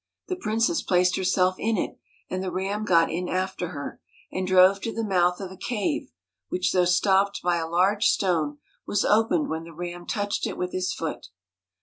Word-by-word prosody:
The 370 - 0
princess 230 0 0
placed 180 -1 +2
herself 185 0 +2
in 225 0 0
it, - - -3 0.3
and 185 - -3
the 190 -1 -3
Ram 195 +4 -2
got 165 -4 +4
in 180 +2 -3
after 185 -1 -2
her, 145 -4 -7 0.3
and 185 0 -2
drove 185 +1 +5
to 230 - -3
the 225 - -3
mouth 180 -3 +2
of 190 -2 -6
a - - -9
cave, 210 - -2 0.4
which 180 0 0
though 180 -1 +4
stopped 195 +3 +2
by 175 -1 +2
a 165 -1 -3
large 190 +5 +3
stone, 160 -6 +1 0.3
was 205 - +1
opened 225 +8 +3
when 160 0 -3
the 165 - -11
Ram 175 +1 -6
touched 205 -2 -1
it - - -5
with 180 0 -2
his 185 0 -1
foot. 160 -2 -5
185 Hz, 195 wpm, -25 LUFS, 175-205 Hz, 0.4 s, drove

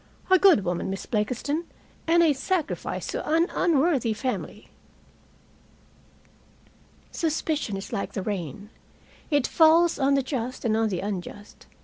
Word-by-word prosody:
"A 375 - +7
good 355 - +5
woman, 175 +1 -2
Miss 195 0 -5
Blakiston, 250 +9 -2 0.4
and 340 +1 +5
a 315 -3 +4
sacrifice 330 +3 -2
to - - -3
an 330 +3 +2
unworthy 290 -8 +2
family." 255 +4 -4 2.4
Suspicion 310 -8 -2
is 195 - -8
like 200 - -3
the 195 - -3
rain. 200 - -5 0.6
It 290 -4 +2
falls 330 +1 +4
on 275 0 +3
the 275 - +1
just 255 -1 -4
and 220 -2 +2
on 225 0 +1
the 185 -3 -3
unjust. 205 +1 -7
265 Hz, 130 wpm, -25 LUFS, 210-320 Hz, 2.4 s, A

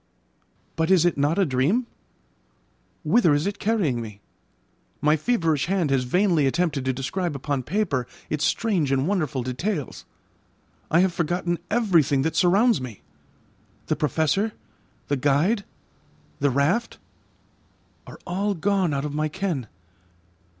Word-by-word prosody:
But 160 0 +1
is 185 -3 +5
it 175 - +2
not 145 +4 +1
a 195 - +3
dream? 150 - +1 1.2
Whither 175 -11 +4
is 145 - 0
it 200 0 -3
carrying 185 - 0
me? 105 -3 -9 0.8
My 150 +1 +3
feverish 160 - 0
hand 180 -6 0
has 130 -2 +1
vainly 170 0 +2
attempted 150 -2 0
to 130 - +2
describe 140 +6 -3
upon 140 0 -2
paper 150 - -1 0.2
its 150 0 -2
strange 180 -7 +1
and 135 +2 +1
wonderful 155 -10 -1
details. 140 - -4 0.8
I 165 +3 +4
have 185 -1 +2
forgotten 175 0 -1
everything 170 - +2
that 160 +1 -1
surrounds 195 - +3
me. 115 - -8 0.8
The - - 0
Professor, 160 - 0 0.5
the 145 - 0
guide, 150 - +1 0.7
the 140 - +2
raft 145 - 0 1.1
are - - -10
all 200 +3 -1
gone 185 -3 +1
out 140 +1 -2
of 145 - -4
my 155 +1 -1
ken. 155 - -3
160 Hz, 135 wpm, -24 LUFS, 140-190 Hz, 1.2 s, is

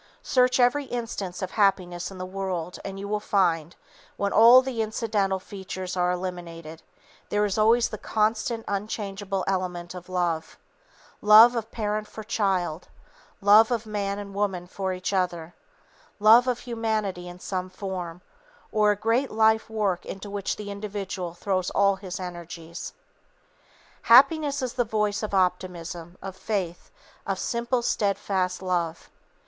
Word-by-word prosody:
Search 255 0 +3
every 250 +4 +3
instance 215 -8 -4
of 185 - -4
happiness 180 -4 +1
in 195 - -10
the 185 - -5
world, 185 -2 -4
and 195 0 -6
you 200 - -5
will 210 +1 -1
find, 175 -6 +1 0.4
when 200 0 -1
all 240 +3 +8
the 255 -4 -2
incidental 215 -3 0
features 185 -1 -6
are 180 -1 +1
eliminated, 170 -3 -6 0.5
there 210 0 +2
is 200 -2 -1
always 230 +2 +4
the 215 - -7
constant, 225 +2 0
unchangeable 200 -1 -3
element 180 -2 -2
of 180 0 -10
love, 175 -3 -2 0.6
love 220 +3 +8
of 225 -1 -3
parent 215 -1 -2
for 220 - -9
child; 190 -6 -1 0.5
love 210 +2 +7
of 235 -2 -1
man 200 -2 -2
and 200 -1 -7
woman 195 -3 -1
for 190 +1 -3
each 185 +2 -3
other; 175 -3 -1 0.6
love 225 +4 +6
of 245 -1 0
humanity 215 -6 -2
in 175 0 -11
some 185 0 -4
form, 185 -2 -6 0.5
or 210 -1 +3
a 205 - +3
great 230 +6 +1
life 220 0 +3
work 205 -5 -1
into 195 +1 -7
which 200 -1 -2
the 205 -1 -7
individual 195 -4 -5
throws 185 -1 -1
all 200 -1 +3
his 190 -1 -6
energies. 170 -2 -7 1.1
Happiness 285 +3 +5
is 250 - -2
the 245 - +1
voice 210 -2 -1
of 210 -2 -3
optimism, 180 -2 -2
of 195 -1 -6
faith, 190 -4 -3 0.4
of 195 -1 -1
simple, 235 +4 -1
steadfast 195 -4 0
love. 170 -3 -2
195 Hz, 145 wpm, -26 LUFS, 180-220 Hz, 1.1 s, all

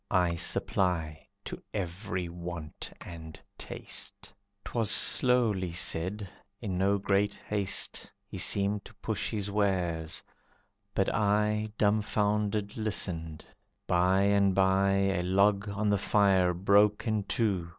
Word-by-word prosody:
I 90 -3 +2
supply 85 -2 -1 0.2
to - - -6
every 90 -1 -3
want 85 -2 -7
and 80 -2 -9 0.2
taste." - - -5 0.3
'Twas 115 -4 -1
slowly 110 -8 +3
said, 90 +4 -1 0.3
in 100 -5 -4
no 100 +1 +3
great 100 0 +1
haste 100 -2 -3
He - - -8
seemed 100 0 +1
to - - -14
push - - -3
his 100 -2 -3
wares, 90 -6 -1 0.7
but 95 - +1
I 105 +1 +1
Dumfounded 105 -1 0
listened. 85 -7 -2 0.4
By 90 +2 +3
and 100 -1 +3
by 95 0 +3
A 95 -2 +1
log 100 +3 +2
on 105 +1 -2
the 100 - +2
fire 95 -3 +3
broke 100 +3 +3
in 110 -2 0
two. 100 -7 -1
100 Hz, 120 wpm, -29 LUFS, 90-105 Hz, 0.7 s, slowly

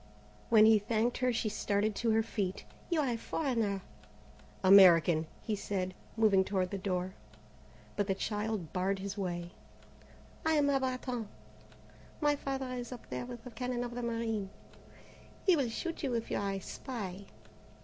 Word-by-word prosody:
When 220 -2 +7
he 220 -1 +7
thanked 225 +3 0
her 250 0 +2
she 230 -1 -1
started 210 0 0
to 235 - 0
her 220 0 +3
feet. 200 -4 -3 0.2
"You 335 -3 +2
are 280 - 0
a 235 - -1
foreigner!" 225 - -1 0.8
"American," 175 -4 +7 0.2
he 215 - -1
said, 185 -2 -3 0.2
moving 205 -4 +5
toward 190 -2 -1
the 200 - -3
door, 185 -1 -2 0.8
but 205 -1 0
the 195 - +1
child 210 -3 -3
barred 190 +1 0
his 195 +1 -5
way. 175 -3 -3 0.9
"I 320 - +2
am 290 -2 +3
a 275 - +3
Bretonne. 255 -3 -2 0.9
My 295 -1 +3
father 270 -2 -3
is 245 -1 -5
up 250 - -10
there 245 - -3
with 240 -2 -8
the 250 - -9
cannon 245 +1 -2
of 240 0 -5
the 245 - -4
marine. 230 -4 -2 1.0
He 375 -3 +6
will 275 -6 +1
shoot 330 +8 -4
you 265 -6 -1
if 230 - -3
you - - +1
are 200 -1 -1
a 195 - -3
spy." 200 -5 -6
220 Hz, 170 wpm, -32 LUFS, 195-245 Hz, 1.0 s, When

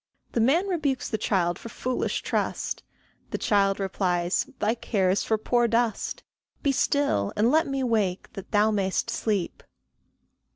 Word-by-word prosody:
The - - -1
man 315 - +3
rebukes 300 -8 -1
the 220 - -2
child 175 -3 +1
for 230 - -8
foolish 255 +3 -2
trust; - - -2 0.5
The - - -2
child 195 -1 +2
replies, 180 -1 0
"Thy 215 +2 +1
care 200 -5 0
is 195 - +1
for 220 - +1
poor 240 +2 +2
dust; 230 -1 0 0.4
Be 280 - +3
still, 270 - +1
and 225 +4 +3
let 320 +2 +3
me 275 -1 -1
wake 210 -7 0
that 195 0 -8
thou 215 0 +3
mayst 200 +2 0
sleep." 205 -6 -1
220 Hz, 155 wpm, -26 LUFS, 195-250 Hz, 0.5 s, man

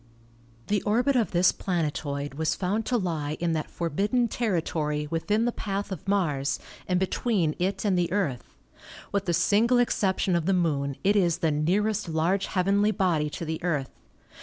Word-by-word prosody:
The 205 -2 0
orbit 245 +6 +2
of 235 -4 +2
this 180 +1 +4
planetoid 145 -5 -2
was 155 +2 0
found 205 +4 -1
to 250 - +2
lie 155 -7 -2
in 170 -1 0
that 155 -1 -2
forbidden 200 - 0
territory 160 -9 -1
within 210 +7 +1
the 240 - +1
path 200 -2 -4
of 190 -1 -6
Mars 150 -9 +1 0.3
and 180 -1 +1
be 190 - +2
tween 190 -7 0
it 190 +4 -1
and 195 -3 +2
the 175 -1 0
Earth. 175 -11 -2 0.6
With 200 -1 -1
the 175 - 0
single 220 +7 +3
exception 195 -6 +1
of 170 0 0
the 195 - +3
Moon 145 -6 0
it 200 +2 +3
is 175 -5 +3
the 160 - +1
nearest 195 +7 0
large 170 +5 +1
heavenly 200 +3 +2
body 175 -8 +1
to 165 - -6
the 160 +2 -4
Earth. 145 -7 -1
180 Hz, 175 wpm, -27 LUFS, 160-205 Hz, 0.6 s, this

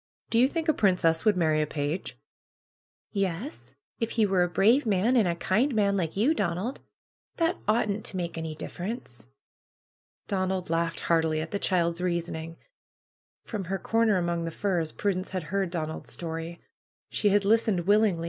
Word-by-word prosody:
Do 230 - +3
you 255 - +6
think 325 +3 -3
a 315 - +5
princess 180 - +2
would 210 -3 +4
marry 155 -3 +2
a 150 - 0
page?" 145 +4 -3 1.0
'^Yes, 195 - -3 0.2
if 230 -2 -1
he 220 - +5
were 190 -2 +2
a 175 - +3
brave 225 +10 +4
man, 210 +5 +2
and 220 -6 +4
a 170 - 0
kind 225 +10 +1
man, 200 -2 +3
like 170 -2 -2
you, 245 +10 +4
Donald. 230 - -2 0.6
That 330 +1 +1
oughtn't 215 -1 +1
to 190 - -1
make 170 -2 -3
any 160 -1 -4
difference." 175 - -6 1.0
Donald 185 -3 -1
laughed 165 0 0
heartily 160 -2 +2
at 160 +1 -4
the 200 - -1
child's 170 -3 +1
reasoning. 165 -2 -3 0.9
From 210 -5 -4
her 195 +3 -2
corner 225 -1 +2
among 170 -1 -1
the - - -2
firs 170 -2 -1
Prudence 190 -2 -1
had 185 -2 -3
heard 195 -2 +1
Donald's 160 -2 -4
story. 165 0 -5 0.5
She 210 - +2
had 200 0 +3
listened 215 -3 +3
willingly. 205 -1 +3
185 Hz, 165 wpm, -27 LUFS, 165-215 Hz, 1.0 s, you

